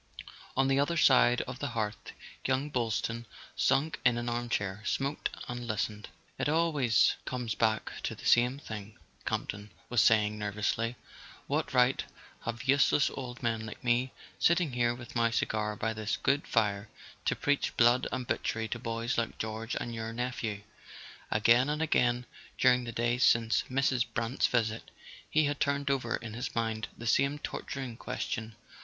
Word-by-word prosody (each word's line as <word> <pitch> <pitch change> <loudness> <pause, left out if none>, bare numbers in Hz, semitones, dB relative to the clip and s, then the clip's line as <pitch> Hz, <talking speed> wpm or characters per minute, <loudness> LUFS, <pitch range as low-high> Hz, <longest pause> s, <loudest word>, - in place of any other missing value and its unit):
On 135 0 +4
the 135 0 +3
other 170 +4 +1
side 125 -4 +5
of 125 0 -7
the 145 - -2
hearth 105 -1 -3 0.3
young 135 +3 0
Boylston, 115 -1 -1 0.3
sunk 150 +3 +2
in 125 -2 +4
an 120 0 -2
armchair, 115 -4 -2
smoked 140 +6 -1 0.2
and 120 0 -5
listened. 105 -1 -2 0.3
"It - - +1
always 150 -7 +3
comes 125 -4 -2
back 110 0 +1
to - - -3
the - - -12
same 125 +2 +4
thing," 110 -6 -8 0.3
Camp - - -1
ton 105 +1 -6 0.2
was 120 -2 +4
saying 105 -1 +4
nervously. 105 +3 -1 0.5
"What - - -1
right - - +4 0.4
have 120 +1 -3
useless 140 +2 +4
old 125 -1 -7
men 115 -2 0
like 105 - -9
me, 125 +1 +2 0.3
sitting 170 -5 +3
here 120 -1 +1
with 120 -2 -11
my 115 0 +3
cigar 105 -2 -1
by 110 +1 -1
this 110 0 -2
good 140 +2 +1
fire, 105 -2 +1 0.4
to - - +2
preach 145 -1 0
blood 120 +2 +5
and 130 -1 -2
butchery 110 -1 -1
to 120 - -3
boys 115 +1 -1
like 115 - -3
George 110 +1 -4
and 120 - -3
your 115 0 -4
nephew? 115 -3 -3 0.4
" - - -13 0.3
Again 115 +5 +4
and 150 +1 -1
again, 125 -6 +2 0.3
during 125 -1 +4
the 120 - -4
days 120 +2 +1
since 115 -1 +3
Mrs. 130 -2 +2
Brant's 115 +3 0
visit, 115 -2 -1 0.4
he 155 0 +3
had 145 0 -1
turned 140 -1 +1
over 125 -4 0
in 115 -2 -7
his 120 +2 -5
mind 110 -1 -1
the 120 - -8
same 140 +5 +2
torturing 135 -4 -5
question. 110 -2 -4
120 Hz, 165 wpm, -30 LUFS, 110-130 Hz, 0.5 s, side